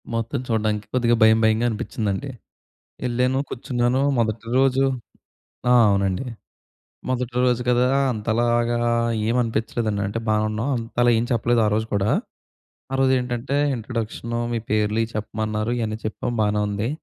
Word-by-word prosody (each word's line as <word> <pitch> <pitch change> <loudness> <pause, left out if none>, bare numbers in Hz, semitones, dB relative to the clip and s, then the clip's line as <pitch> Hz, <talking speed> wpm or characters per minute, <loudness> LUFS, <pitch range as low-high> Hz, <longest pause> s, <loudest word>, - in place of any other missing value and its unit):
మొత్తం 115 +4 -2
చూడడానికి 110 -2 0
కొద్దిగా 120 -2 +3
భయం, 110 0 +6
భయంగా 110 +2 +3
అనిపిచ్చిందండి. 110 +3 -3 0.8
యెళ్ళాను, 125 +2 +1
కూర్చున్నాను 125 +1 0 0.2
మొదటి 115 0 -1
రోజు 135 0 +3 0.9
ఆ! - - +7 0.2
అవునండి. 100 +3 0 0.8
మొదటి 125 -1 -2
రోజు 125 -1 +2
కదా! 125 +1 +3 0.2
అంతలాగా 120 +2 +1 0.5
ఏమి 120 +2 +1
అనిపిచ్చలేదండి. 110 -2 -2
అంటే 115 +3 -3
బావున్నాం. 110 +4 0
అంతలా 120 +1 +1
ఏం 115 - 0
చెప్పలేదు 120 0 +2
ఆ - - +3
రోజు 110 +1 0
కూడా. 100 +1 +1 0.8
ఆ - - +1
రోజు 130 0 +4
ఏంటంటే 125 +2 -3 0.2
ఇంట్రడక్షను 115 0 -4
మీ 115 - 0
పేర్లు 105 +1 +1
ఇయి 115 - -5
చెప్పమన్నారు. 110 +1 -2
ఇయన్నీ 110 -1 -2
చెప్పాం 110 +2 -3
బానే 105 0 +1
ఉంది. 105 +4 -2
115 Hz, 135 wpm, -23 LUFS, 110-120 Hz, 0.9 s, ఆ